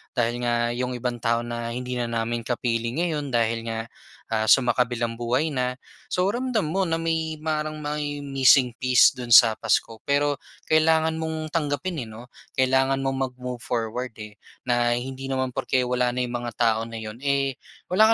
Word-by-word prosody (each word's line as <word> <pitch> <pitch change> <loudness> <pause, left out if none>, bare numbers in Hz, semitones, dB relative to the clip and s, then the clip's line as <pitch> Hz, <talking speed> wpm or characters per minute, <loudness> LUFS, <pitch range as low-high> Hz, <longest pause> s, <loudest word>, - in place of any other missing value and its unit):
dahil 120 -1 0
nga 120 0 +1
'yong 125 +1 -2
ibang 120 0 -3
tao 115 0 +1
na 115 0 -4
hindi 125 +1 -5
na 120 - -1
namin 115 0 -2
kapiling 120 -1 -1
ngayon 155 -5 -1
dahil 115 0 +1
nga, 115 0 -2 0.5
ah, 110 -1 +1
sumakabilang 120 -2 +2
buhay 120 +7 +1
na. 125 -2 -1 0.3
So, 180 - 0
ramdam 240 -7 -1
mo 190 +1 +1
na 165 - +1
may 160 -1 -1
parang 155 -1 -2
may 145 -1 -3
missing 135 -2 +4
piece 125 -1 +6
do'n 125 -1 -7
sa 110 -1 +8
Pasko. 110 0 0
Pero 145 0 +1 0.3
kailangan 160 0 +3
mong 160 -1 -3
tanggapin, 150 -1 -2
eh - - -12
'no. 115 +3 -11 0.3
Kailangan 135 +1 +2
mong 135 0 -1 0.2
mag-move 125 -1 -6
forward, 115 +1 -3
eh, 105 -1 -10 0.2
na 120 -1 +2
hindi 130 +2 -5
naman 130 -1 -1
porke 130 +1 0
wala 125 0 0
na 125 - 0
yung 120 0 -4
mga - - -4
tao 115 -2 +2
na 115 - -9
'yon, 110 +1 -7
eh, 140 -1 0 0.3
wala 220 +4 +6
125 Hz, 175 wpm, -25 LUFS, 120-145 Hz, 0.5 s, sa